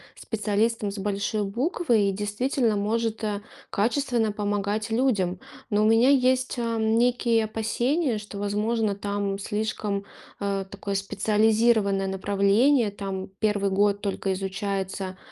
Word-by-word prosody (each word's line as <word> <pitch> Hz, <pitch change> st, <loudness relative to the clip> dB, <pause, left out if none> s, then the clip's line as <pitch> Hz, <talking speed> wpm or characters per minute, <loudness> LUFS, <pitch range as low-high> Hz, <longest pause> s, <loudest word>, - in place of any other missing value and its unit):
специалистом 215 Hz, 0 st, -1 dB
с 200 Hz, -, -7 dB
большой 205 Hz, +1 st, -1 dB
буквы 235 Hz, -, +1 dB
и -, -, +1 dB
действительно 215 Hz, +4 st, 0 dB
может, 220 Hz, +2 st, -1 dB
э, 210 Hz, -1 st, -2 dB, 0.3 s
качественно 235 Hz, 0 st, +1 dB
помогать 205 Hz, +1 st, -2 dB
людям. 210 Hz, -7 st, +1 dB, 0.3 s
Но 210 Hz, 0 st, +3 dB
у -, -, +3 dB
меня 225 Hz, +4 st, +5 dB
есть, 260 Hz, -1 st, +2 dB
ам, 225 Hz, -1 st, +1 dB
некие 235 Hz, -2 st, +2 dB
опасения, 235 Hz, +5 st, 0 dB
что, 210 Hz, -1 st, -9 dB
возможно, 210 Hz, +1 st, 0 dB
там 200 Hz, 0 st, -2 dB
слишком, 210 Hz, -1 st, -2 dB, 0.3 s
а, 200 Hz, -1 st, -1 dB
такое 200 Hz, +1 st, -6 dB
специализированное 210 Hz, 0 st, +2 dB
направление. 200 Hz, +6 st, +2 dB
Там 195 Hz, -2 st, -5 dB
1 205 Hz, -2 st, +1 dB
год 200 Hz, +1 st, +2 dB
только 195 Hz, -1 st, -1 dB
изучается, 190 Hz, 0 st, -3 dB
210 Hz, 120 wpm, -25 LUFS, 200-230 Hz, 0.3 s, меня